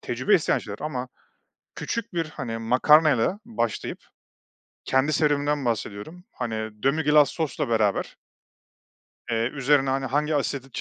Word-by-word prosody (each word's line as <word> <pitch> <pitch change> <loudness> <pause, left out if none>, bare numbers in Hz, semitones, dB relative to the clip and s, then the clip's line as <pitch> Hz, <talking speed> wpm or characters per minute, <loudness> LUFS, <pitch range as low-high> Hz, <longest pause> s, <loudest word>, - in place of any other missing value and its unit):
tecrübe - - +1
isteyen - - +2
şeyler. - - -8
Ama - - -4 0.7
küçük 230 -6 -4
bir, 165 -1 0
hani, 115 -6 -5
makarnayla 140 - +4
başlayıp 215 - -3 0.9
kendi 130 +3 +1
serüvenimden 145 -1 +1
bahsediyorum. 120 - -4
Hani, 120 -3 -4 0.3
demi-glace 150 +1 +4
sosla 155 -4 -2
beraber 110 -3 0 1.2
eee, 115 +1 0
üzerine, 135 -1 +2
hani, 135 0 -1
hangi 150 +4 0
asidi 140 -2 -2
140 Hz, 115 wpm, -25 LUFS, 120-150 Hz, 1.2 s, makarnayla